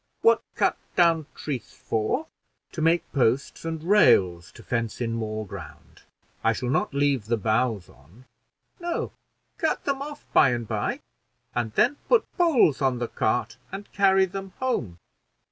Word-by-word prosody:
"What 455 - +5
cut - - +2 0.2
down 165 -3 +3
trees 135 -5 -5
for?" 115 - -1 0.5
"To 165 - -5
make 165 +1 +3
posts 135 +2 +1
and 160 -1 -4
rails 90 - +4
to - - -13
fence 115 -3 -2
in 115 -2 -1
more 110 -1 -3
ground. 95 - -11 0.4
I - - +3
shall 125 - -2
not - - +1
leave 140 -5 +1
the 115 0 +1
boughs 110 -2 0
on." 80 - -20 0.5
"No 345 -1 -2 0.5
cut 315 - 0
them 275 -1 -1
off 295 +1 -7
by 130 - +6
and 120 -2 -3
by, - - -2 0.5
and 120 -2 -1
then 270 - +3
put 485 - +4
poles 300 - +4
on 130 -2 +2
the 120 -1 -3
cart 115 +1 -1
and 195 +2 -8
carry 195 -1 +4
them 195 0 -7
home." 120 - -2
135 Hz, 155 wpm, -25 LUFS, -, 0.5 s, by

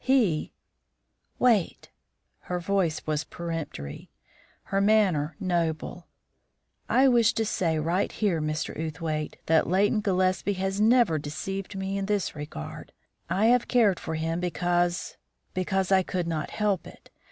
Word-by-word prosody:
He 230 - +2 0.4
" - - -48
"Wait!" 210 -8 +1 0.5
Her 180 0 -4
voice 175 -3 0
was 155 0 -1
peremptory; 160 - -6 0.5
her 195 0 0
manner 195 -8 +3
noble. 170 -2 -2 0.8
"I 270 +1 +5
wish 235 -3 +4
to 225 - +1
say 170 -6 0
right 170 +5 0
here, 190 -7 0
Mr. 155 0 -2
Outhwaite, 155 -1 -3
that 160 0 +3
Leighton 205 +4 +2
Gillespie 185 0 +1
has 195 +1 -2
never 225 -7 +4
deceived 195 +7 -5
me 195 +1 -2
in 195 - -3
this 205 -6 -1
regard. 145 - -8 0.4
I 190 +5 +2
have 250 -1 +1
cared 220 -7 +3
for 160 - -4
him 165 +1 -1
because 175 0 0 0.4
because 190 +1 -1
I 190 -1 +6
could 185 -1 -2
not 155 -3 -2
help 205 -5 -1
it. - - -15
180 Hz, 140 wpm, -27 LUFS, 160-200 Hz, 0.8 s, I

